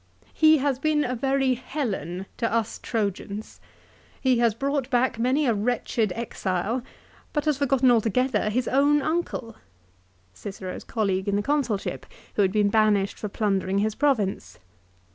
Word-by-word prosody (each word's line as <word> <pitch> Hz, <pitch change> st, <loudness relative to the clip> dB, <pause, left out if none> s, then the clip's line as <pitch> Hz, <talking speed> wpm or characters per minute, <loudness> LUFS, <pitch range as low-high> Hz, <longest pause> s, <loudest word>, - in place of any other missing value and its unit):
" 95 Hz, +2 st, -31 dB
He 315 Hz, 0 st, +6 dB
has 275 Hz, -2 st, 0 dB
been 305 Hz, 0 st, +2 dB
a 250 Hz, -, -2 dB
very 270 Hz, +1 st, +1 dB
Helen 210 Hz, -, -4 dB
to 230 Hz, -, -1 dB
us 230 Hz, -1 st, -1 dB
Trojans." 205 Hz, -1 st, -3 dB, 0.6 s
"He 255 Hz, -3 st, +2 dB
has 230 Hz, -3 st, +3 dB
brought 275 Hz, +1 st, -1 dB
back 245 Hz, -2 st, +1 dB
many 260 Hz, +5 st, +2 dB
a 240 Hz, -, +3 dB
wretched 220 Hz, -1 st, 0 dB
exile, 215 Hz, 0 st, -2 dB, 0.5 s
but 295 Hz, -1 st, -1 dB
has 300 Hz, -3 st, +1 dB
forgotten 270 Hz, -2 st, +3 dB
altogether 230 Hz, 0 st, +2 dB
his 240 Hz, +3 st, -1 dB
own 285 Hz, +2 st, +3 dB
uncle; 310 Hz, -8 st, -2 dB, 0.4 s
" 90 Hz, 0 st, -37 dB
Cicero's 190 Hz, -, -7 dB
colleague 195 Hz, -4 st, -1 dB
in 200 Hz, -, +1 dB
the 205 Hz, -, 0 dB
Consulship 270 Hz, -8 st, -1 dB, 0.3 s
who -, -, +1 dB
had 190 Hz, -2 st, +3 dB
been 205 Hz, 0 st, +2 dB
banished 205 Hz, -2 st, +2 dB
for 210 Hz, -, -4 dB
plundering 195 Hz, -2 st, 0 dB
his 215 Hz, +1 st, +1 dB
province. 210 Hz, -, 0 dB
230 Hz, 155 wpm, -25 LUFS, 200-270 Hz, 0.6 s, He